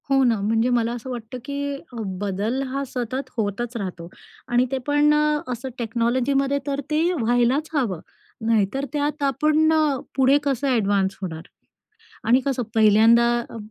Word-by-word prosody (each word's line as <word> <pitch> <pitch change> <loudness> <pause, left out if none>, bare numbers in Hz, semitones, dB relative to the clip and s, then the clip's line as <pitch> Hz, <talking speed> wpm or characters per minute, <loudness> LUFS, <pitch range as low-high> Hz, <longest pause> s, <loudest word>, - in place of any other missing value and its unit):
हो 270 -1 +4
ना, 235 -4 +2
म्हणजे 225 +4 +1
मला 235 -2 +1
असं 245 +2 -7
वाटतं 240 0 -6
की 280 0 -3 0.4
बदल 205 +6 -2
हा 275 +2 -3
सतत 255 +2 -4
होतच 225 +3 -2
राहतो 180 -5 -5 0.4
आणि 245 +1 +2
ते 270 - 0
पण 290 +1 +4
अ, 300 0 +2
असं 250 +2 -4
टेक्नॉलॉजीमध्ये 255 +4 0
तर 280 0 -1
ते 305 +1 +2 0.2
व्हायलाच 245 +6 +2
हवं. 235 - 0 0.5
नाहीतर 225 +4 +1
त्यात 295 0 -1
आपण 305 +3 +2
अ, 305 -3 +2 0.2
पुढे 270 +1 +4
कसं 280 -1 -1
एडव्हान्स 200 -6 +1
होणार? 165 -4 -5 0.9
आणि 245 +3 +5
कसं 265 -3 0
पहिल्यांदा 225 +2 +5 0.2
अ, - - -8
250 Hz, 150 wpm, -23 LUFS, 225-280 Hz, 0.9 s, आणि